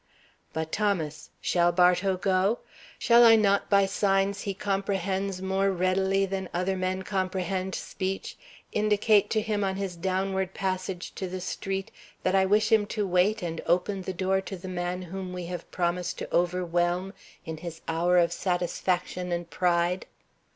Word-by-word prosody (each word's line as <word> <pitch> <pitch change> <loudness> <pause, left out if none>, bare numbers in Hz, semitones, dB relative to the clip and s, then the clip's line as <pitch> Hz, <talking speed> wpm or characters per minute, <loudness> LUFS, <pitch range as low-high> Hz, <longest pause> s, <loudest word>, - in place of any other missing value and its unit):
But 160 0 -3
Thomas, 180 -8 -1
shall 175 -1 +3
Bartow 180 +2 +3
go? 190 +4 +2 0.4
Shall 235 0 +6
I 225 -1 +9
not 200 -2 +2
by 200 -1 +5
signs 195 0 +1
he 200 -2 -3
comprehends 195 -1 -1
more 190 +1 +1
readily 190 +1 +1
than 190 -1 -4
other 185 +2 0
men 185 0 -2
comprehend 185 -1 -2
speech 190 +1 -4 0.4
indicate 210 -1 +3
to 215 - +1
him 210 -1 -1
on 190 -1 0
his 195 -2 -3
downward 190 +1 -1
passage 185 -1 -3
to 190 - -4
the 185 +1 -5
street 195 +1 -4 0.3
that 185 - +1
I 190 0 +4
wish 210 +2 +3
him 215 -2 +4
to 210 0 -1
wait 190 +4 +2
and 165 -1 -3
open 190 +3 +1
the 190 - -4
door 190 +1 0
to 190 0 -7
the 185 +2 -9
man 180 0 -3
whom 185 +1 -6
we 180 -1 -5
have 175 0 -6
promised 180 0 -1
to - - -4
overwhelm 175 +1 0 0.3
in 160 0 -5
his 165 0 -8
hour 170 +2 +2
of 170 -1 +3
satisfaction 180 0 -1
and 170 -1 -3
pride? 175 0 +1
185 Hz, 160 wpm, -27 LUFS, 180-195 Hz, 0.4 s, I